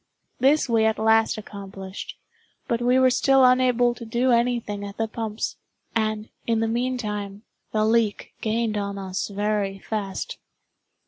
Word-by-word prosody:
This 275 +4 +4
we 230 -2 +3
at 220 0 +2
last 220 +1 +3
accomplished—but 200 - -7
we 250 +1 +3
were 260 0 +5
still 270 +1 +5
unable 250 -1 +4
to 240 - -10
do 240 +3 +1
any 240 +1 +3
thing 205 -2 -6
at 200 0 -7
the 225 - 0
pumps; 220 0 -4 0.4
and, 215 -1 -1 0.2
in 230 -1 +2
the 225 - +1
meantime, 215 -4 -2 0.3
the 215 0 +2
leak 220 -2 +1
gained 220 -1 0
on 200 0 -3
us 190 -1 -3
very 205 -1 -1
fast. 200 -1 -4
220 Hz, 145 wpm, -24 LUFS, 205-240 Hz, 0.4 s, were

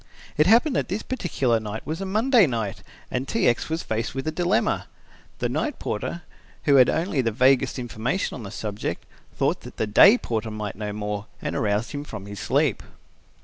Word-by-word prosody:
It 155 +2 +4
happened 245 +7 +5
that - - 0
this 200 +4 -3
particular 140 - 0
night 110 0 -6
was 160 +4 -4
a 195 - -3
Monday 220 - +4
night 110 -6 -3 0.3
and 125 +2 -2
T. 230 - +1
X. 120 - +1
was 160 +1 -2
faced 115 +3 -3
with 135 - -3
a - - +1
dilemma. 175 +3 0 0.5
The - - -1
night - - -2
porter, 170 - -4 0.4
who 140 -2 +5
had 130 -2 +7
only 165 -4 0
the 115 - +1
vaguest 130 +5 +3
information 125 - -2
on 125 - -6
the 100 - -7
subject, 105 0 -4 0.3
thought - - +1
that - - -11
the - - 0
day 195 - +7
porter 115 - -3
might 105 -1 -4
know 105 +1 -4
more, 105 0 -4
and - - -4
aroused 105 -3 0
him 145 -1 -4
from 110 -8 -8
his 100 0 -8
sleep. - - +1
125 Hz, 195 wpm, -24 LUFS, 110-170 Hz, 0.5 s, had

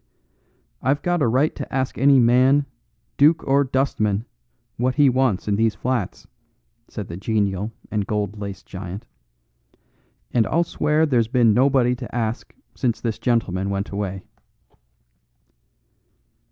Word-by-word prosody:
"I've 140 +3 0
got 175 -2 0
a 140 - +3
right 130 +7 +2
to - - -7
ask 130 0 -1
any 140 0 +5
man, 130 +4 +4 0.5
duke 155 +3 +4
or 140 +1 +4
dustman, 120 -6 0 0.5
what 125 +2 0
he 145 -2 +5
wants 125 -7 0
in 100 -1 +1
these 110 -1 +1
flats," 120 -4 -3 0.6
said 105 -4 -7
the 85 - -7
genial 100 0 -1 0.2
and 105 -2 -1
gold 105 -1 -2
laced 100 -2 -7
giant, 95 +3 -8 1.3
"and 115 -3 +2
I'll 170 +3 +2
swear 155 -1 +1
there's 120 -7 +2
been 120 -2 +3
nobody 130 0 +3
to 120 -2 -8
ask 115 -1 -3 0.2
since 120 -3 -1
this 115 -3 -3
gentleman 100 -6 0
went 100 +1 -3
away." 95 -2 -4
120 Hz, 135 wpm, -22 LUFS, 105-135 Hz, 1.3 s, any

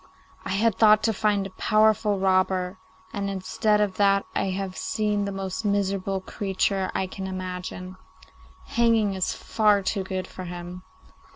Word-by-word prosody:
I - - -4
had 215 +1 +1
thought 215 -1 +6
to 225 0 +2
find 205 -1 +1
a 195 - -7
powerful 215 0 +2
robber, 185 -1 +1 0.3
and 200 -1 -2
instead 205 +2 0
of 205 -3 0
that 200 -1 +3
I - - 0
have 190 0 -3
seen 210 -2 -1
the 200 - -3
most 195 +1 -4
miserable 195 -1 0
creature 195 0 -1
I 190 - +1
can 190 +1 -6
imagine. 185 0 -6 0.7
Hanging 225 -3 +2
is 190 -1 -1
far 210 -2 +2
too 195 0 -1
good 185 -1 -3
for 185 0 -9
him. 175 +1 -7
195 Hz, 155 wpm, -25 LUFS, 185-210 Hz, 0.7 s, thought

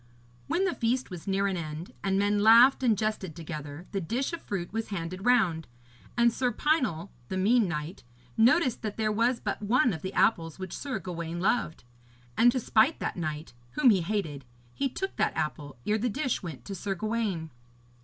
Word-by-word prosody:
When 380 +3 +1
the 365 - 0
feast 240 0 -1
was 175 -1 -8
near 195 0 +1
an 195 -1 0
end, 160 0 -6
and 195 0 +1
men 205 +1 +2
laughed 235 +6 +7
and 230 -5 +3
jested 215 -5 -2
together, 155 -1 -7
the 195 - -2
dish 240 - -2
of 335 - -4
fruit 190 -2 -4
was 225 0 -2
handed 185 +1 -4
round, 180 -11 +3 0.5
and 235 -1 +4
Sir 250 0 0
Pinel, 240 - 0 0.2
the 190 - -2
mean 215 +3 +3
knight, 155 +2 -5 0.3
noticed 250 +3 +3
that 215 -2 -4
there 215 -1 +1
was 235 +3 +1
but - - -3
one 240 +3 +3
of 160 - -6
the 190 +2 -5
apples 165 -7 +2
which 185 -2 -6
Sir 280 -2 -3
Gawaine 170 -2 -5
loved; 190 -3 0 0.5
and 240 +1 +6
to 255 - -1
spite 235 +6 +3
that - - -3
knight, 155 -3 -4 0.2
whom 265 -5 +5
he 190 -4 +3
hated, 165 -7 -3 0.3
he 275 -1 -1
took 385 +9 -4
that - - 0
apple, 150 -3 -3
ere 215 +1 +1
the 245 +3 0
dish 260 +2 -1
went 150 -9 -8
to 200 - -6
Sir 195 +1 -3
Gawaine. 210 -6 -2
200 Hz, 195 wpm, -28 LUFS, 170-235 Hz, 0.5 s, laughed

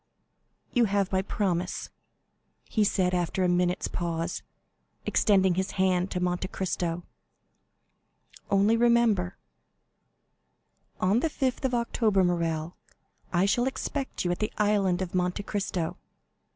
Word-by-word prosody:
"You 245 -2 +4
have 200 -2 0
my 190 -1 +2
promise," 185 -3 -2 0.7
he 215 - 0
said, 185 -3 +1
after 180 +1 0
a - - +3
minute's 180 0 +1
pause, 165 -1 -3 0.6
extending 190 -3 +3
his 190 +2 -2
hand 185 0 +2
to 180 - -2
Monte 180 +1 -1
Cristo. 175 -2 -2 1.5
"Only 200 +3 +4
remember——" 230 -6 +3 1.6
"On 195 +5 +3
the 320 - 0
5th 265 -2 -1
of 255 -2 +1
October, 225 -4 +2
Morrel, 170 -2 -1 0.6
I 180 +1 +3
shall 240 +6 +2
expect 265 -3 -3
you 175 - +2
at 175 - -2
the 215 - -1
Island 200 -3 +2
of 175 - -7
Monte 180 +2 0
Cristo. 195 -5 -2
190 Hz, 125 wpm, -28 LUFS, 180-210 Hz, 1.6 s, You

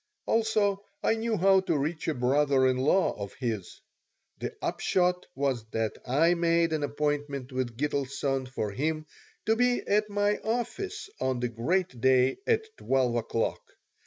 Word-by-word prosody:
Also, 215 -3 +1 0.2
I - - +3
knew 225 0 -1
how 190 +2 +5
to 180 -5 0
reach 155 +3 -2
a 160 - 0
brother 135 +2 +3
in 130 -1 +2
law 150 +9 +3
of 100 - -6
his. 110 -7 -4 0.6
The - - -5
upshot 180 -1 0
was 135 -4 0
that 110 -1 -1
I 155 +7 +4
made 170 -1 +2
an 155 - 0
appointment 145 -2 -2
with 130 -3 -3
Gitelson 140 -1 -1
for 110 -5 -3
him 155 +7 -2 0.4
to 220 - +3
be 245 +1 +2
at 210 +1 +2
my 205 0 +1
office 370 - -3
on 130 -2 0
the 125 0 -1
great 130 +3 -1
day 130 0 +4
at 445 -1 +3
12 130 -3 +1
o'clock. 115 -1 -1
145 Hz, 155 wpm, -28 LUFS, 130-195 Hz, 0.6 s, how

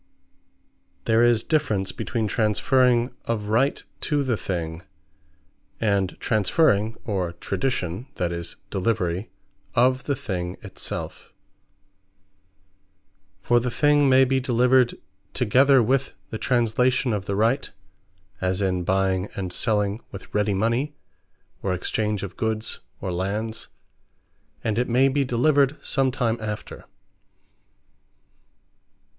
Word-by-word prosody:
There 115 0 +4
is 120 -2 +4
difference, 110 - 0
between 115 -3 -2
transferring 120 +4 +2
of 105 -3 -2
Right 125 +6 +2 0.3
to 145 -1 +2
the 130 -4 0
Thing; 85 -5 -4 1.0
and 100 -4 0
transferring, 110 - +2
or 95 -5 -2
tradition, 95 +2 -2
that 90 -2 -1
is, 85 -1 -5 0.2
delivery 95 -1 -1 0.5
of 130 +2 +3
the 140 - 0
Thing 90 -6 -4
it - - -11
selfe. - - -5 2.1
For 120 +4 +3
the 125 +1 -2
Thing 145 +2 +3
may 130 0 +6
be 135 +1 +1
delivered 125 -1 +3 0.4
together 130 +2 +5
with 135 +3 +1 0.2
the 110 - -4
Translation 125 0 +2
of 100 -2 -2
the 100 - -1
Right; 115 +7 +1 0.7
as 95 0 0
in 95 -2 0
buying 95 +1 +1
and 95 -2 -4
selling 105 0 0
with 95 - -10
ready 105 -1 +1
mony; 120 +9 0 0.7
or 95 -2 0
exchange 105 +2 -1
of 95 -2 -6
goods, 110 0 -2 0.2
or 95 - -3
lands: 105 +5 -3 1.0
and 110 0 0
it 125 - 0
may 130 +3 +4
be 140 +1 +1
delivered 140 +3 +2
some 135 -1 +1
time 120 -3 -1
after. 105 -1 -6
110 Hz, 115 wpm, -24 LUFS, 100-130 Hz, 2.1 s, may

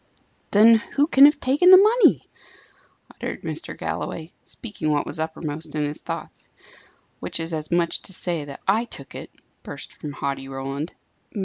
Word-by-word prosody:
"Then 225 +3 +7 0.2
who 285 - +4
can 280 -3 +7
have 295 0 +4
taken 285 +8 +3
the 370 - +11
money?" 435 +5 +4 0.9
uttered - - -6
Mr. - - -4
Galloway, 160 0 -5
speaking 210 -9 -5
what 145 -1 0
was - - -5
uppermost 160 -1 -3
in 150 -1 0
his 145 +1 -5
thoughts. - - -7 0.7
"Which - - -4
is 165 +1 -3
as 155 -1 -4
much 170 -1 +1
as - - -18
to 190 - -10
say 170 -3 -2
that 140 -1 -10
I 220 +5 +2
took 140 - -9
it," - - -8 0.3
burst - - -9
from 150 -1 -8
haughty 140 -1 -4
Roland. 135 +3 -5
165 Hz, 170 wpm, -23 LUFS, 150-235 Hz, 0.9 s, the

